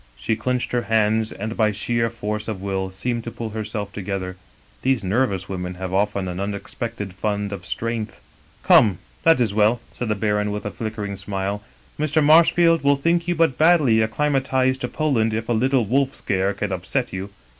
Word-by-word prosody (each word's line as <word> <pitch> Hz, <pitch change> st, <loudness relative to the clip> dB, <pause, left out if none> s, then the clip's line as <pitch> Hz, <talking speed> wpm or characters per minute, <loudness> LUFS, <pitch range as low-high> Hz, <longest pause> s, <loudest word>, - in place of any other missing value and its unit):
" -, -, -31 dB
She 60 Hz, -, -1 dB
clinched 125 Hz, +3 st, -2 dB
her 120 Hz, -, +1 dB
hands, 110 Hz, 0 st, +2 dB
and 110 Hz, +3 st, -5 dB
by 110 Hz, -2 st, +2 dB
sheer 115 Hz, +3 st, 0 dB
force 105 Hz, -1 st, -4 dB
of 110 Hz, -4 st, -3 dB
will 95 Hz, -1 st, -2 dB
seemed 115 Hz, +5 st, -3 dB
to -, -, -3 dB
pull 115 Hz, -1 st, -6 dB
herself 105 Hz, -2 st, -4 dB
together. 95 Hz, -2 st, -4 dB, 0.5 s
These 130 Hz, -4 st, +1 dB
nervous 100 Hz, -2 st, 0 dB
women 90 Hz, -1 st, -4 dB
have 95 Hz, 0 st, -5 dB
often 100 Hz, -1 st, 0 dB
an 90 Hz, 0 st, -4 dB
unexpected 100 Hz, +1 st, -4 dB
fund 100 Hz, +1 st, -2 dB
of 100 Hz, -1 st, -7 dB
strength. 115 Hz, -1 st, -3 dB, 0.2 s
" -, -, -30 dB
* -, -, -31 dB
Come, 100 Hz, -6 st, +6 dB, 0.2 s
that 165 Hz, -4 st, +5 dB
is 115 Hz, -5 st, +1 dB
well,' 110 Hz, +3 st, +3 dB
said 125 Hz, -, -5 dB
the 105 Hz, -, +1 dB
baron 105 Hz, 0 st, 0 dB
with 105 Hz, 0 st, -4 dB
a 105 Hz, -, -2 dB
flickering 105 Hz, -3 st, -5 dB
smile; 100 Hz, +1 st, -3 dB, 0.2 s
' -, -, -30 dB
Mr. 155 Hz, 0 st, +2 dB
Marshfield 165 Hz, +1 st, +5 dB
will 140 Hz, 0 st, +5 dB
think 170 Hz, +4 st, +1 dB
you 175 Hz, -, +1 dB
but 160 Hz, -6 st, +2 dB
badly 155 Hz, -8 st, +5 dB
acclima 135 Hz, +6 st, +1 dB
tized 130 Hz, 0 st, +1 dB
to 125 Hz, -, -1 dB
Poland 120 Hz, -7 st, 0 dB
if 110 Hz, +1 st, -4 dB
a -, -, +3 dB
Uttle 125 Hz, 0 st, +2 dB
wolf 135 Hz, +4 st, +1 dB
scare 95 Hz, 0 st, 0 dB
can 105 Hz, -1 st, -3 dB
upset 95 Hz, +8 st, -2 dB
you. 95 Hz, +1 st, -4 dB
110 Hz, 200 wpm, -22 LUFS, 100-125 Hz, 0.5 s, Come